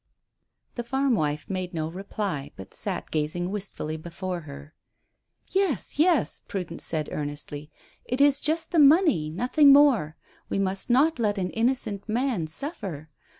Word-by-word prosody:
The 240 - -4
farm 265 +2 +1
wife 150 -6 -1
made 185 -2 -4
no 155 -1 -1
reply, 190 -5 -4
but 95 - -11
sat - - -5
gazing 160 +4 -1
wistfully 190 -6 -4
before 175 +3 -5
her. 145 +2 -10 0.8
"Yes, 370 - 0
yes," 320 -6 +2
Prudence 180 -4 -4
said 155 -2 0
earnestly. 145 0 -5 0.4
"It 250 +2 -2
is 285 0 +4
just 320 +3 0
the 340 - +3
money 290 - +5
nothing 255 - +4
more. 260 - +5 0.3
We - - -1
must 195 +2 -1
not 270 +4 +3
let 210 -2 +1
an 185 -1 -2
innocent 225 -4 -1
man 230 -7 0
suffer. 165 - -6
195 Hz, 145 wpm, -26 LUFS, -, 0.8 s, money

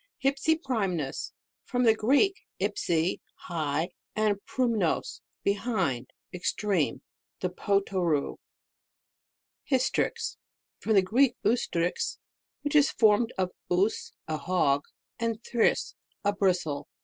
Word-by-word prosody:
HYFSIPRVMNUS. 260 - 0 0.3
From 250 -1 0
the 225 -2 +6
Greek, 275 - +3 0.3
ipsi, 185 -4 0 0.2
high, 160 0 -2 0.3
nndprumnog, 215 +2 +1 0.4
behind, 200 - 0 0.2
extreme. 180 -2 0 0.4
The 180 - -1
Potoroo. 185 -6 0 1.3
HYSTRIX. 265 - 0 0.4
From 220 - 0
the 195 -2 +6
Greek, 245 +6 +3
ustrix. 180 -7 0 0.5
which 290 +1 -1
is 295 -1 +6
formed 220 +1 +4
of 185 -1 0 0.2
us, 190 +5 +1
a 155 -1 -1
hog, 145 -5 +1 0.3
and 230 -1 -1
thrix, 235 -2 +1 0.3
a 205 - +3
bristle. 180 -7 0
200 Hz, 95 wpm, -28 LUFS, 175-240 Hz, 1.3 s, the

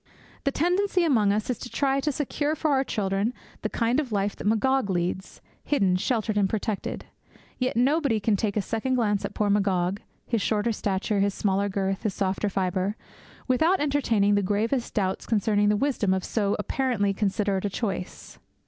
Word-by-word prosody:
The 275 - +2
tendency 360 +4 +1
among 225 -11 +3
us 210 +1 -1
is 245 - -4
to 245 - -7
try 275 0 +1
to 295 +2 0
secure 295 +2 -1
for 310 -1 0
our 270 -1 +3
children 205 0 -1 0.3
the 215 - -2
kind 235 +5 +1
of 275 -6 -3
life 200 -1 0
that - - -5
Magog 255 +2 +2
leads, 180 +1 -2 0.2
hidden, 195 -11 +2
sheltered, 215 +1 0
and 195 -1 +2
protected. 215 -1 -3 0.5
Yet 255 -2 0
nobody 275 -2 +2
can 210 0 +2
take 205 +1 -1
a 205 - +1
second 240 +5 -1
glance 210 -5 +1
at - - -6
poor 205 -1 +1
Magog 195 -1 +1 0.2
his 230 -3 0
shorter 215 +3 +1
stature, 200 0 -1
his 200 0 +1
smaller 200 0 +1
girth, 195 0 -1
his 215 -4 -2
softer 195 +1 0
fibre 190 +1 -1 0.5
without 315 +9 +3
entertaining 245 -9 +2
the 205 - +3
gravest 220 +6 -1
doubts 190 -3 -1
concerning 205 -1 +2
the 210 - +3
wisdom 215 -8 +1
of 190 - -2
so 205 -3 0
apparently 210 -3 0
considerate 200 -1 0
a - - 0
choice. 195 -3 -5
210 Hz, 180 wpm, -26 LUFS, 200-255 Hz, 0.5 s, among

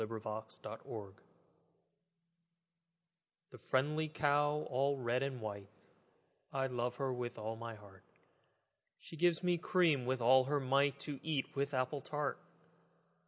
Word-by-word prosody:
XXIII 110 0 -3
The 110 +1 -6
Cow 100 -4 -7 2.4
The - - -10
friendly 150 +4 +1
cow 145 0 +2
all 140 +2 +1
red 125 0 0
and 135 -2 -2
white, 100 -3 -5 0.8
I 135 0 0
love 125 -1 -2
with 125 -3 -2
all 110 +1 -3
my 115 0 -6
heart: 100 -3 -15 1.0
She - - -11
gives 170 +1 +3
me 175 -1 +2
cream 160 -8 +3
with 130 0 +1
all 130 +2 +6
her 145 +2 +1
might, 140 +1 +3
To 145 -2 -5
eat 155 -4 -2
with 140 0 0
apple 130 +2 0
tart. 145 +1 -2
130 Hz, 130 wpm, -36 LUFS, 120-145 Hz, 2.4 s, all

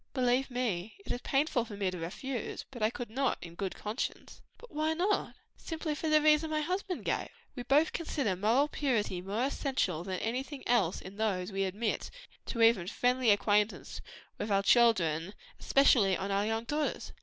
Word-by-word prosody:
"Believe 255 +1 +2
me, 225 -6 -2
it - - -4
is 245 - -3
painful 270 -3 +1
to 210 -3 -9
me 195 -2 0
to 180 - -6
refuse, 230 +9 -5
but 245 -4 -9
I 215 - +3
could 240 -1 -7
not, 270 +3 0
in 170 -1 -10
conscience." 210 +5 -4 0.2
"But 485 - -15
why 310 +1 0
not?" 380 +5 0 0.2
"Simply 320 -1 -4
for 310 +2 -3
the 305 -1 +4
reason 305 +1 +4
my 310 0 0
husband 365 +3 -3
gave. - - -1 0.3
We 250 - -4
both 280 +6 +3
consider 280 - -1
moral 225 +10 +3
purity 230 -12 -1
more 200 +6 -2
essential 260 - -1
than 185 0 -3
anything 260 +6 -4
else 210 -8 +2
in 190 +2 -10
those 205 -3 -1
we 195 0 0
admit 210 +4 -2 0.4
to 230 -2 0
even 225 -6 +4
friendly 250 +3 +1
intercourse 205 +1 +1 0.4
with 210 - -3
our 200 0 +3
children; 190 -7 +3 0.2
especially 225 -9 +4
our 200 +3 0
daughters." 295 +6 -3
235 Hz, 170 wpm, -31 LUFS, 200-275 Hz, 0.4 s, the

